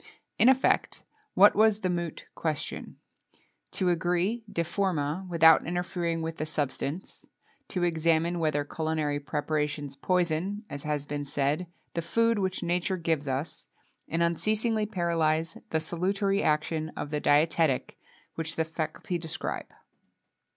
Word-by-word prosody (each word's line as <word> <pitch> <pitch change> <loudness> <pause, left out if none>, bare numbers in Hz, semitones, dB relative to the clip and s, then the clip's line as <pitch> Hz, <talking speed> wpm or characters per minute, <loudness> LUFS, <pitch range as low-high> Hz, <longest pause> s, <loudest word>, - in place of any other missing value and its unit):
In 245 - +7
effect, 265 0 +2 0.3
what 205 +2 +7
was 215 0 +4
the 185 - 0
moot 170 -2 -3
question? 155 -2 -3 0.8
To 185 -2 +1
agree, 180 +7 0
de 170 -4 0
forma, 170 -1 -1
without 165 -2 +6
interfering 175 -1 -2
with 165 0 -4
the 155 - -2
substance; 145 +3 -3 0.4
to 180 - -2
examine 165 0 +2
whether 155 -3 +1
culinary 155 -1 -1
preparations 150 -1 -2
poison, 180 +6 0
as 145 - -5
has 150 -1 -2
been 145 0 -3
said, 145 +5 0 0.3
the 170 - -1
food 230 +5 +2
which 190 -1 -1
nature 175 +1 0
gives 160 -4 -1
us, 135 +4 -3 0.4
and 165 +1 0
unceasingly 215 +6 +1
paralyze 165 -4 0
the 160 - +1
salutary 195 +5 0
action 155 +1 0
of 145 - -4
the 150 - 0
dietetic, 150 -2 +2 0.4
which 165 0 -3
the 160 - +1
faculty 160 +2 -3
prescribe. 160 -1 -4
165 Hz, 130 wpm, -28 LUFS, 155-180 Hz, 0.8 s, In